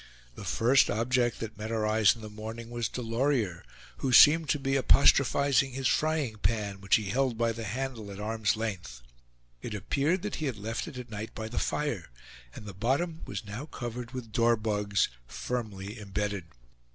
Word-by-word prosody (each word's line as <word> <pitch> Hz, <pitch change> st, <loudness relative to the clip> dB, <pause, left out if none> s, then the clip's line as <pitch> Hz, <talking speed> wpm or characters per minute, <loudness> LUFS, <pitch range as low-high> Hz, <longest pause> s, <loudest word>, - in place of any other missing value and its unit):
The -, -, -9 dB
first 125 Hz, +4 st, +4 dB
object 120 Hz, +2 st, +1 dB
that 110 Hz, -1 st, -6 dB
met 110 Hz, +1 st, -4 dB
our 110 Hz, -2 st, 0 dB
eyes 110 Hz, 0 st, +4 dB
in 115 Hz, -, -12 dB
the 110 Hz, -, -7 dB
morning 110 Hz, +2 st, -7 dB
was 120 Hz, -2 st, -2 dB
Delorier, 115 Hz, -, -1 dB, 0.3 s
who 135 Hz, -, -1 dB
seemed 155 Hz, +4 st, +7 dB
to -, -, +3 dB
be 135 Hz, -1 st, -1 dB
apostrophizing 140 Hz, 0 st, +4 dB
his 130 Hz, 0 st, -1 dB
frying 155 Hz, -8 st, 0 dB
pan, 105 Hz, -3 st, -1 dB
which 100 Hz, -, +4 dB
he 105 Hz, -3 st, -1 dB
held 130 Hz, -2 st, +1 dB
by 115 Hz, 0 st, +2 dB
the 115 Hz, 0 st, -5 dB
handle 120 Hz, -1 st, -4 dB
at 100 Hz, 0 st, -8 dB
arm's 110 Hz, -1 st, 0 dB
length. 90 Hz, -, -5 dB, 0.6 s
It 105 Hz, -, -5 dB
appeared 145 Hz, -, 0 dB
that 210 Hz, -, -3 dB
he 155 Hz, -, -2 dB
had 125 Hz, -5 st, -3 dB
left 110 Hz, +3 st, -4 dB
it 130 Hz, -, -8 dB
at 125 Hz, -2 st, -8 dB
night 105 Hz, +1 st, -6 dB
by 110 Hz, 0 st, -5 dB
the 120 Hz, -, -2 dB
fire; 125 Hz, -, -2 dB, 0.5 s
and -, -, -9 dB
the 100 Hz, -, -7 dB
bottom 140 Hz, -, -1 dB
was -, -, -5 dB
now 110 Hz, +9 st, -6 dB
covered 120 Hz, -3 st, -6 dB
with 125 Hz, -4 st, -7 dB
dorbugs, 105 Hz, -4 st, +2 dB, 0.2 s
firmly 105 Hz, -, -5 dB
imbedded. 100 Hz, -2 st, -3 dB
115 Hz, 180 wpm, -29 LUFS, 105-130 Hz, 0.6 s, seemed